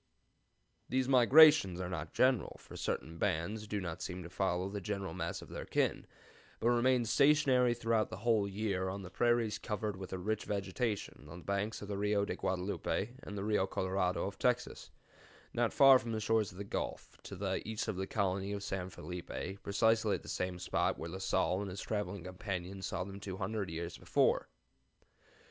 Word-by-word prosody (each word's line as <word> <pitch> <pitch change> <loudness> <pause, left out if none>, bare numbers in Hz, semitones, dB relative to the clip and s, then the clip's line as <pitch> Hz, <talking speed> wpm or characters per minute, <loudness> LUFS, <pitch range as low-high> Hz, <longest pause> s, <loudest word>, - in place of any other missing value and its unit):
"These 130 0 +1
migrations 130 - +7
are 90 - -2
not 80 -3 -4
general, 130 -5 +2
for - - -13
certain 80 +1 -3
bands 105 +3 -1
do 105 0 -2
not 90 -2 -5
seem 90 0 -5
to 85 - -10
follow 95 -1 0
the 100 +1 -5
general 100 -2 -3
mass - - -4
of - - -13
their - - -5
kin, - - 0 0.5
but 115 - +2
remain 120 0 +3
stationary 130 -2 +4
throughout 115 -2 +1
the - - -6
whole 110 -4 +3
year 100 -2 -1
on 100 +1 -5
the 90 - -9
prairies 120 0 +2
covered 105 -2 -3
with 95 -1 -8
a 95 - -2
rich 105 +4 -2
vegetation 105 - -3
on 85 - -9
the 90 - -11
banks 100 +2 -2
of - - -7
the 100 -1 -3
Rio 105 0 +2
de - - -3
Guadelupe 95 +3 -1
and 105 - -7
the 100 - -3
Rio 105 -2 +1
Colorado 95 -1 0
of 100 0 -6
Texas, 125 -1 0 0.6
not 120 -1 +1
far 135 -2 +8
from 115 -1 -5
the 110 - -1
shores 110 -1 +1
of 90 - -14
the 100 - -4
Gulf, 100 - -4
to - - -8
the 95 0 -2
east 110 0 -3
of 110 - -1
the 95 +1 -3
colony 100 -1 -1
of 100 0 -4
San 95 -2 -3
Felipe, 90 +1 -6
precisely 110 +1 +2
at - - -7
the - - -12
same 90 -1 -2
spot 90 - 0
where 85 - -6
La 95 - -5
Salle 95 0 +1
and 100 - -4
his 95 +2 -6
traveling 100 -4 -3
companions 95 0 -5
saw 95 -1 -2
them 100 +1 -8
two 95 -2 -6
hundred 100 +1 -2
years 85 +1 -5
before. - - +2
100 Hz, 195 wpm, -34 LUFS, 95-110 Hz, 0.6 s, far